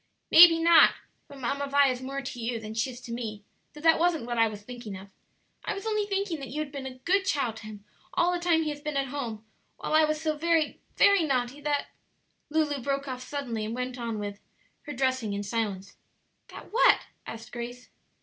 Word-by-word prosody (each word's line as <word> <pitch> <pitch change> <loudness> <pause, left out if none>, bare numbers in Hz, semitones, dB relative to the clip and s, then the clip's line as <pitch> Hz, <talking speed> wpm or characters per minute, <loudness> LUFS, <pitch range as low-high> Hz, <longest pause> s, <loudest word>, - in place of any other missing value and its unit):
"Maybe 330 0 +10
not; 330 0 +6 0.3
but 280 - -12
Mamma 280 +2 -2
Vi 280 0 +4
is 250 -1 -3
more 275 +1 -4
to 255 -2 -6
you 230 0 -2
than 215 0 -7
she 225 +4 0
is 245 -1 -9
to 235 0 -7
me; 215 -4 -5 0.3
though 300 - -11
that 325 0 +5
wasn't 330 -6 +1
what 240 -1 -2
I 225 - +5
was 210 -1 -8
thinking 235 -4 -8
of. 195 +1 -13 0.5
I - - -2
was 395 - -7
only 425 -2 0
thinking 390 -5 -1
that 270 - -6
you 300 - -4
had 305 -2 -3
been 275 -2 -6
a 255 -1 -9
good 375 +9 +1
child 270 - -1
to 215 - -10
him 205 -1 -10 0.3
all 350 +1 +3
the 355 - -1
time 340 -2 +2
he 305 - -1
has 290 0 -8
been 300 -1 -3
at 270 -1 -1
home, 230 -6 -5 0.3
while - - -4
I 310 0 +6
was 305 0 -1
so 310 -1 -1
very, 325 0 +1 0.2
very 400 -2 +6
naughty 265 -1 -1
that 290 -1 -1 0.3
" - - -46
Lulu 295 -3 0
broke 275 +2 -2
off 255 -1 -5
suddenly 255 -5 -4
and 220 +2 -4
went 250 0 -4
on 230 -2 -3
with, 205 -1 -5 0.5
her 295 - -4
dressing 260 -4 0
in 200 0 -3
silence. 205 -3 -3 0.5
"That - - -12
what?" 480 - +5 0.3
asked 230 +1 -8
Grace. 245 +1 -7
270 Hz, 225 wpm, -28 LUFS, 230-310 Hz, 0.5 s, Maybe